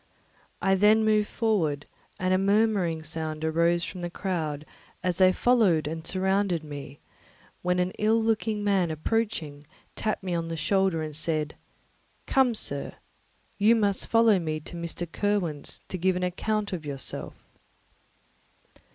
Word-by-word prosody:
I 195 - +4
then 210 +3 +4
moved 215 -1 +3
forward, 170 -11 0 0.3
and 185 0 +1
a 185 - +3
murmuring 200 -5 +2
sound 155 0 -4
arose 170 +2 +2
from 180 - -6
the 175 - -3
crowd 160 -6 -3 0.4
as 180 -1 0
they 185 0 +7
followed 195 -9 +3
and 160 +1 -5
surrounded 190 -2 +1
me, 145 -2 -8 0.6
when 180 0 +1
an 180 0 +1
ill 220 +2 +3
looking 220 -1 0
man 195 -4 +2
approaching 160 -3 -2 0.3
tapped 215 -2 -2
me 185 -2 -2
on 165 -1 -1
the 165 0 -4
shoulder 190 -1 +1
and 155 -1 -5
said, 155 -1 -1 0.7
"Come, 260 -3 +3
sir, 140 -8 0 0.7
you 215 +3 +5
must 205 -3 +1
follow 225 -3 +4
me 155 -2 -2
to 175 - -8
Mr. 170 0 -3
Kirwin's 175 -4 -1
to 185 - -4
give 185 +1 +2
an 180 - -2
account 205 +3 -1
of 170 -4 -4
yourself." 140 -3 -4
180 Hz, 145 wpm, -27 LUFS, 160-210 Hz, 0.7 s, they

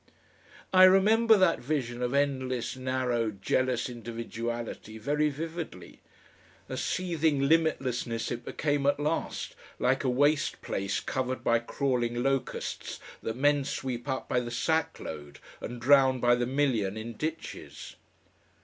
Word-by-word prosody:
I 185 0 +9
remember 215 +4 +6
that 185 -3 +3
vision 125 -3 -2
of 125 0 0
endless, 130 -4 0
narrow, 130 -3 0
jealous 120 +5 0
individuality 115 -1 -5
very 150 +7 +1
vividly. 160 - -6 0.7
A - - -5
seething 160 -6 0
limitlessness 130 -7 +1
it 120 0 -4
became 145 -2 -1
at 145 - +2
last, 150 +3 -2 0.2
like 130 +2 +1
a 130 - +1
waste 145 +4 +2
place 100 0 -2
covered 130 0 -2
by 115 0 +3
crawling 120 -1 -1
locusts 135 -1 -2 0.2
that 110 - -3
men 145 +1 +3
sweep 130 -1 -4
up 130 - -2
by 125 - +1
the 120 -1 -4
sackload 120 - -2 0.2
and 120 +1 -6
drown 130 0 +5
by 120 0 +4
the 120 0 +1
million 125 -7 0
in 115 +2 -6
ditches.... 155 +7 -6
130 Hz, 130 wpm, -29 LUFS, 120-145 Hz, 0.7 s, I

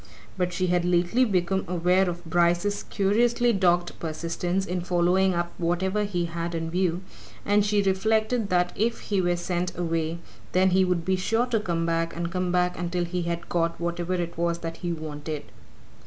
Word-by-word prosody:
But 180 -1 -1
she 185 +1 -1
had 180 -1 +2
lately 180 +8 +3
become 190 -2 0
aware 180 +2 +2
of 175 0 -6
Bryce's 175 +4 +1
curiously 235 +4 +2
dogged 175 -3 +1
persistence 170 +3 -2
in 180 -1 -2
following 180 +2 +2
up 170 0 -1
whatever 190 +4 0
he 180 -4 -1
had 170 0 -4
in 165 0 -3
view, 180 0 0 0.4
and 205 0 +3
she 205 0 +2
reflected 215 +3 +1
that 180 -1 +2
if 230 +3 0
he 200 -2 0
were 175 -1 +1
sent 175 +1 -2
away 165 -1 -1 0.4
then 185 +1 +4
he 190 +1 +4
would 180 -2 0
be 190 0 +1
sure 225 +6 +1
to 240 -3 0
come 170 -5 -1
back 165 0 -1
and 170 0 -3
come 180 -1 -1
back 180 -1 +1
until 175 0 -1
he 180 +1 -2
had 170 0 -3
got 170 -1 0
whatever 175 +1 -2
it 170 -1 -4
was 170 0 +1
that 165 0 -4
he 175 - -3
wanted. 155 -2 -5
180 Hz, 185 wpm, -26 LUFS, 170-190 Hz, 0.4 s, then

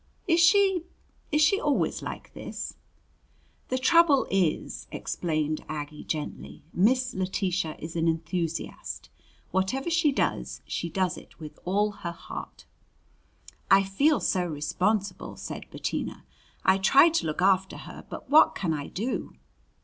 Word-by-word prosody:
"Is 335 -1 +4
she 385 +1 +5 0.5
is 300 0 +4
she 395 +7 +4
always - - +1
like - - -7
this?" - - -6 0.9
"The 255 - 0
trouble 295 +1 +5
is," 185 -5 0
explained 155 -2 -2
Aggie 150 -1 -5
gently, 155 -2 -5
"Miss 250 +7 +3
Letitia 185 -3 -1
is 160 +1 -8
an 165 0 +1
enthusiast. 165 0 -3 0.4
Whatever 190 - 0
she 330 -3 +3
does, 275 - -1
she 170 - -3
does 185 0 -1 0.2
with 155 -2 -10
all 205 +3 +2
her 180 -4 -6
heart." 170 - -9 1.0
"I 195 0 +7
feel 275 +11 +2
so 185 - +1
responsible," 185 +7 -1
said - - -7
Bettina. - - -4 0.4
"I 190 +1 +5
try 275 - +7
to 325 - 0
look 155 +4 -1
after 190 0 +3
her, - - -10
but - - -8
what 310 +3 +6
can 170 -4 -1
I 145 -2 -4
do?" 230 +7 -3
190 Hz, 135 wpm, -27 LUFS, 165-270 Hz, 1.0 s, I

